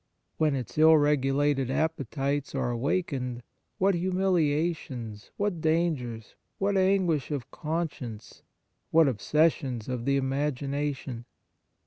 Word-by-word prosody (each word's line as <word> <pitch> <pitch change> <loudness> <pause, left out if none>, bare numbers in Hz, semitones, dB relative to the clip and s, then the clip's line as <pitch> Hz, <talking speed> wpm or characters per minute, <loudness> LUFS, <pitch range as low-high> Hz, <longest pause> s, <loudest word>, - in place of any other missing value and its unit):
When 155 -3 +2
its 130 +2 -4
ill 160 0 +8
regulated 145 -1 +2
appe 155 -1 -1
tites 140 0 -2
are 120 - 0
awakened, 125 -2 -2 0.3
what 195 +1 +3
humilia 175 -3 +1
tions, 115 -7 -8
what 200 -5 -1
dangers, 155 -9 -1 0.2
what 200 +1 0
anguish 185 -6 +2
of 145 -5 -4
conscience, 150 -9 -5 0.5
what 160 -1 +5
obsessions 135 -1 +1
of 125 -2 -3
the 140 0 +2
imagination 140 -2 -2
145 Hz, 110 wpm, -28 LUFS, 130-165 Hz, 0.5 s, ill